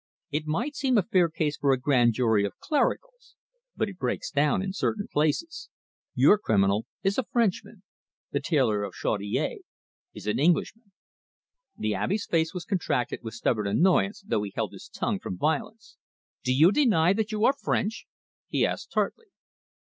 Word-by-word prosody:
It 150 Hz, +1 st, -2 dB
might 235 Hz, -, -2 dB
seem 265 Hz, -4 st, +1 dB
a 205 Hz, -, +3 dB
fair 180 Hz, -4 st, +2 dB
case 155 Hz, -2 st, -2 dB
for 140 Hz, -, +2 dB
a 130 Hz, -, +2 dB
grand 125 Hz, -3 st, +3 dB
jury 110 Hz, -4 st, +2 dB
of 100 Hz, -, -4 dB
clericals. -, -, -2 dB, 0.4 s
But -, -, 0 dB
it 195 Hz, -3 st, -10 dB
breaks 125 Hz, -2 st, -2 dB
down 145 Hz, +5 st, +2 dB
in 190 Hz, -1 st, -3 dB
certain 205 Hz, +1 st, -2 dB
places. 155 Hz, -, -1 dB, 0.5 s
Your 210 Hz, -, +5 dB
criminal 100 Hz, -, +1 dB, 0.2 s
is 195 Hz, +5 st, +1 dB
a -, -, 0 dB
Frenchman; 220 Hz, -3 st, -1 dB, 0.5 s
the -, -, 0 dB
tailor 130 Hz, -11 st, +1 dB
of 100 Hz, -, -5 dB
Chaudiere 100 Hz, -1 st, -2 dB, 0.6 s
is -, -, -9 dB
an 105 Hz, -, 0 dB
Englishman." 195 Hz, -, +1 dB, 0.9 s
The 110 Hz, 0 st, -1 dB
Abbe's 185 Hz, -, -1 dB
face 160 Hz, -1 st, +1 dB
was 180 Hz, -2 st, -6 dB
contracted 170 Hz, -, -1 dB
with 110 Hz, -1 st, -7 dB
stubborn 110 Hz, -3 st, 0 dB
annoyance, 190 Hz, -, +2 dB
though 110 Hz, -, 0 dB
he 105 Hz, -1 st, -5 dB
held -, -, -2 dB
his -, -, -11 dB
tongue -, -, -2 dB
from 90 Hz, -, -6 dB
violence. 215 Hz, -, -2 dB, 0.5 s
"Do 130 Hz, -, 0 dB
you 155 Hz, +8 st, +6 dB
deny 195 Hz, -, +3 dB
that 220 Hz, +1 st, -2 dB
you 215 Hz, +1 st, +1 dB
are 270 Hz, -, +5 dB
French?" 225 Hz, -5 st, -2 dB, 0.4 s
he -, -, +1 dB
asked -, -, -4 dB
tartly. 465 Hz, -, -1 dB
165 Hz, 170 wpm, -27 LUFS, -, 0.9 s, you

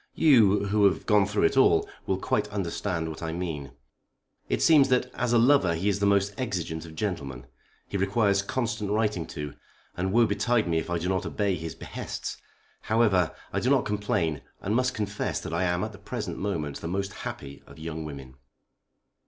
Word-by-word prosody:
You, 110 Hz, -10 st, +5 dB
who 105 Hz, 0 st, +4 dB
have 95 Hz, -, +2 dB
gone 105 Hz, -3 st, +4 dB
through 105 Hz, 0 st, 0 dB
it -, -, +3 dB
all, 85 Hz, -11 st, +4 dB, 0.2 s
will 95 Hz, -, +1 dB
quite 105 Hz, +2 st, 0 dB
understand 95 Hz, -4 st, -2 dB
what 80 Hz, -1 st, -7 dB
I 80 Hz, -1 st, -3 dB
mean. 80 Hz, -5 st, -4 dB, 0.8 s
It -, -, +1 dB
seems 150 Hz, -4 st, +6 dB
that 125 Hz, 0 st, +1 dB
as 125 Hz, -1 st, -1 dB
a 120 Hz, -, +5 dB
lover 115 Hz, -8 st, +4 dB
he 95 Hz, +5 st, 0 dB
is 100 Hz, -1 st, 0 dB
the 100 Hz, -, +2 dB
most 100 Hz, 0 st, +2 dB
exigeant 85 Hz, -9 st, -3 dB
of 80 Hz, -, -11 dB
gentlemen. 70 Hz, -, -4 dB, 0.4 s
He 100 Hz, -, -3 dB
requires 100 Hz, 0 st, +2 dB
constant 110 Hz, -1 st, -2 dB
writing 105 Hz, -6 st, 0 dB
to, 75 Hz, -1 st, -6 dB, 0.4 s
and 95 Hz, +1 st, -1 dB
woe 115 Hz, +3 st, +5 dB
betide 105 Hz, +1 st, +1 dB
me 80 Hz, -1 st, +1 dB
if 80 Hz, -, -5 dB
I 85 Hz, -, 0 dB
do 85 Hz, +2 st, -3 dB
not 95 Hz, 0 st, 0 dB
obey 100 Hz, -2 st, 0 dB
his 80 Hz, -2 st, -5 dB
behests. -, -, -6 dB, 0.4 s
However, 105 Hz, -7 st, +2 dB, 0.2 s
I -, -, +1 dB
do 125 Hz, -, 0 dB
not 135 Hz, -2 st, +3 dB
complain, 105 Hz, -7 st, -1 dB, 0.2 s
and 105 Hz, +3 st, -1 dB
must 125 Hz, 0 st, +1 dB
confess 105 Hz, -1 st, -2 dB
that -, -, -6 dB
I 90 Hz, +2 st, +1 dB
am 90 Hz, +1 st, 0 dB
at 110 Hz, -, -3 dB
the 100 Hz, -, -13 dB
present 100 Hz, -, -5 dB
moment 80 Hz, -8 st, -3 dB
the 80 Hz, -, -4 dB
most 100 Hz, +3 st, -2 dB
happy 70 Hz, 0 st, -7 dB
of -, -, -14 dB
young 80 Hz, 0 st, -5 dB
women." 70 Hz, -4 st, -8 dB
100 Hz, 195 wpm, -27 LUFS, 85-105 Hz, 0.8 s, seems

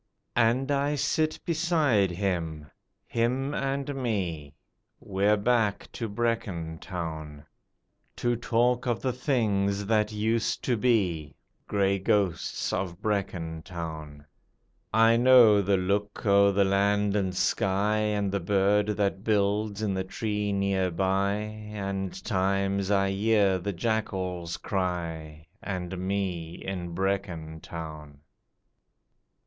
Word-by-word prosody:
And 125 Hz, +5 st, +2 dB
I 140 Hz, +1 st, +1 dB
sit 155 Hz, +2 st, 0 dB
beside 160 Hz, -, +2 dB
him 85 Hz, -5 st, -3 dB, 0.3 s
him 130 Hz, +4 st, 0 dB
and 140 Hz, 0 st, -2 dB
me, 90 Hz, -, -3 dB, 0.4 s
(We're 100 Hz, +2 st, +1 dB
back 110 Hz, -1 st, +1 dB
to 115 Hz, -2 st, -4 dB
Brecon 100 Hz, -8 st, -2 dB
Town.) 80 Hz, -5 st, -6 dB, 0.7 s
To 120 Hz, 0 st, 0 dB
talk 120 Hz, +2 st, +1 dB
of 120 Hz, -2 st, -1 dB
the 130 Hz, -2 st, 0 dB
things 100 Hz, -7 st, 0 dB
that 105 Hz, 0 st, +2 dB
used 110 Hz, +1 st, 0 dB
to 125 Hz, -, +1 dB
be 95 Hz, -, +1 dB, 0.3 s
(Grey 100 Hz, -1 st, +1 dB
ghosts 95 Hz, -3 st, 0 dB
of 90 Hz, -2 st, -3 dB
Brecon 95 Hz, -6 st, -2 dB
Town); 80 Hz, -4 st, -7 dB, 0.7 s
I 115 Hz, +1 st, +5 dB
know 120 Hz, -4 st, +7 dB
the 100 Hz, 0 st, +2 dB
look 100 Hz, +3 st, -1 dB
o' 100 Hz, 0 st, +5 dB
the 100 Hz, 0 st, +3 dB
land 100 Hz, +1 st, +2 dB
and 95 Hz, -3 st, 0 dB
sky, 100 Hz, +3 st, +1 dB
And 105 Hz, -2 st, 0 dB
the 100 Hz, -, 0 dB
bird 100 Hz, +3 st, +2 dB
that 100 Hz, -1 st, 0 dB
builds 105 Hz, 0 st, +1 dB
in 100 Hz, -2 st, 0 dB
the 95 Hz, 0 st, -1 dB
tree 105 Hz, +1 st, -2 dB
near 100 Hz, -2 st, +1 dB
by, 95 Hz, +3 st, +1 dB
And 105 Hz, -2 st, -5 dB
times 100 Hz, 0 st, 0 dB
I 100 Hz, -1 st, +2 dB
hear 100 Hz, -2 st, +2 dB
the 100 Hz, +3 st, -3 dB
jackals 95 Hz, -4 st, -2 dB
cry, 80 Hz, -5 st, -3 dB, 0.2 s
And 95 Hz, -2 st, -4 dB
me 90 Hz, -4 st, -2 dB
in 90 Hz, -3 st, -5 dB
Brecon 90 Hz, -4 st, -2 dB
Town. 75 Hz, -3 st, -8 dB
100 Hz, 120 wpm, -27 LUFS, 90-110 Hz, 0.7 s, know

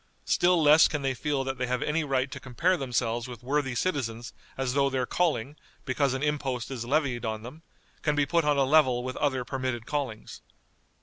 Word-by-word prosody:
Still 175 Hz, 0 st, +3 dB
less 155 Hz, 0 st, +7 dB
can 150 Hz, -2 st, -3 dB
they 135 Hz, -1 st, +1 dB
feel 140 Hz, +1 st, -1 dB
that 135 Hz, -1 st, -4 dB
they 125 Hz, -, -1 dB
have 125 Hz, 0 st, -1 dB
any 155 Hz, +2 st, 0 dB
right 135 Hz, -2 st, 0 dB
to -, -, -6 dB
compare 150 Hz, +9 st, +1 dB
themselves 120 Hz, -4 st, -1 dB
with 120 Hz, -2 st, -10 dB
worthy 135 Hz, -1 st, -1 dB
citizens 120 Hz, -7 st, -2 dB, 0.2 s
as 130 Hz, -1 st, -1 dB
though 140 Hz, 0 st, +3 dB
their 130 Hz, -1 st, -1 dB
calling, 150 Hz, -4 st, -1 dB, 0.3 s
because 130 Hz, 0 st, +1 dB
an 135 Hz, -, -3 dB
impost 135 Hz, -5 st, -2 dB
is 125 Hz, -3 st, -4 dB
levied 135 Hz, -3 st, 0 dB
on 110 Hz, -1 st, -3 dB
them, 135 Hz, +7 st, -10 dB, 0.4 s
can 150 Hz, -1 st, +1 dB
be 145 Hz, -1 st, +2 dB
put 170 Hz, +4 st, +1 dB
on 150 Hz, -1 st, +2 dB
a 140 Hz, -, +4 dB
level 130 Hz, -4 st, +3 dB
with 130 Hz, 0 st, -4 dB
other 130 Hz, -4 st, 0 dB
permitted 130 Hz, -3 st, -3 dB
callings. 135 Hz, -7 st, -4 dB
135 Hz, 200 wpm, -27 LUFS, 125-150 Hz, 0.4 s, less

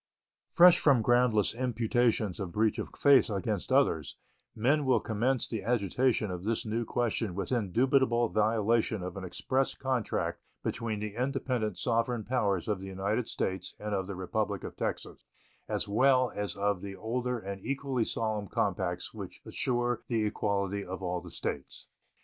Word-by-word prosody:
Fresh 180 Hz, 0 st, +7 dB
from 135 Hz, -7 st, +4 dB
groundless 120 Hz, -3 st, +3 dB
imputations 120 Hz, -4 st, 0 dB
of 95 Hz, -4 st, -4 dB
breach 110 Hz, +4 st, +1 dB
of -, -, -4 dB
faith 140 Hz, -3 st, +5 dB
against 105 Hz, +1 st, -2 dB
others, 130 Hz, -, +2 dB, 0.4 s
men 140 Hz, +7 st, +2 dB
will 130 Hz, -2 st, +3 dB
commence 120 Hz, +3 st, 0 dB
the 110 Hz, -3 st, -3 dB
agitation 115 Hz, -1 st, +1 dB
of 90 Hz, 0 st, -5 dB
this 115 Hz, +3 st, -1 dB
new 115 Hz, +2 st, -1 dB
question 115 Hz, -5 st, -1 dB
with 100 Hz, -, -3 dB
indubitable 120 Hz, +2 st, +2 dB
violation 110 Hz, -1 st, +1 dB
of 90 Hz, -1 st, -5 dB
an 95 Hz, -, -6 dB
express 130 Hz, +9 st, -1 dB
compact 130 Hz, -4 st, -2 dB, 0.2 s
between 110 Hz, -2 st, -2 dB
the 105 Hz, -1 st, -4 dB
independent 125 Hz, -4 st, -1 dB
sovereign 115 Hz, -1 st, 0 dB
powers 100 Hz, -7 st, 0 dB
of 105 Hz, -3 st, 0 dB
the 95 Hz, -, -7 dB
United 100 Hz, +5 st, -1 dB
States 95 Hz, -1 st, -3 dB
and 105 Hz, 0 st, -4 dB
of 95 Hz, -2 st, -1 dB
the 100 Hz, -, -5 dB
Republic 100 Hz, +2 st, -2 dB
of -, -, -7 dB
Texas, -, -, -4 dB, 0.5 s
as -, -, -1 dB
well 130 Hz, +4 st, +3 dB
as 100 Hz, -3 st, -3 dB
of 100 Hz, -2 st, 0 dB
the 100 Hz, -1 st, -6 dB
older 125 Hz, +4 st, -2 dB
and 100 Hz, -3 st, -7 dB
equally 135 Hz, -1 st, -1 dB
solemn 110 Hz, -2 st, -2 dB
compacts -, -, -2 dB
which -, -, -9 dB
assure 120 Hz, -2 st, 0 dB
the 115 Hz, -3 st, +1 dB
equality 100 Hz, -1 st, -1 dB
of 95 Hz, +1 st, -6 dB
all 90 Hz, -1 st, -2 dB
the 90 Hz, -, -10 dB
States. 70 Hz, -4 st, -5 dB
110 Hz, 160 wpm, -30 LUFS, 100-125 Hz, 0.5 s, Fresh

